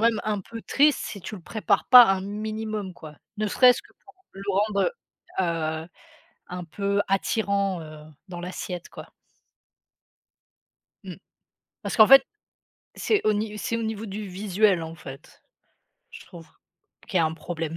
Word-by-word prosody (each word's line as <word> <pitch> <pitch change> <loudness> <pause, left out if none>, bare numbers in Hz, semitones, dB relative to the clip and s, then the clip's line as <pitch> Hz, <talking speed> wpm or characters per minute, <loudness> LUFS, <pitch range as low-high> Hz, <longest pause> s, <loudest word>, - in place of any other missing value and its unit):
même 230 -1 +3
un 210 -2 -1
peu 230 +4 -10
triste, 290 +1 +3
si 200 - -6
tu 210 +4 -7
le 180 - -13
prépares 215 0 0
pas 250 -1 +11
un 195 -1 +1
minimum, 215 -1 -5
quoi, 155 -3 -12 0.2
ne 215 - 0
serait-ce 250 +3 +5
que - - -22
pour 395 - -18 0.2
le 195 - -10
rendre, 200 - +1 0.5
heu - - +2 0.4
heu, - - -16 0.6
un 180 0 -6
peu 200 +4 -1
attirant, 195 -2 0
heu, 155 -1 -11 0.3
dans 175 -1 -7
l'assiette, 180 -1 -6
quoi. - - -12 1.9
Mmh. - - -8 0.7
Parce - - -4
qu'en 215 -1 +8
fait, 270 0 +8 0.7
c'est 430 - +1
au 215 - +4
ni 210 0 -3
c'est 230 +3 -2
au 230 - -3
niveau 220 0 -4
du 205 0 -6
visuel, 195 -1 +1
en 160 0 -8
fait. 135 -3 -12 0.7
Je - - -12
trouve 170 -1 -13 0.6
qu'il 185 - 0
y - - +4
a - - +3
un 160 - -4
problème. 165 -1 -5
200 Hz, 160 wpm, -25 LUFS, 180-220 Hz, 1.9 s, pas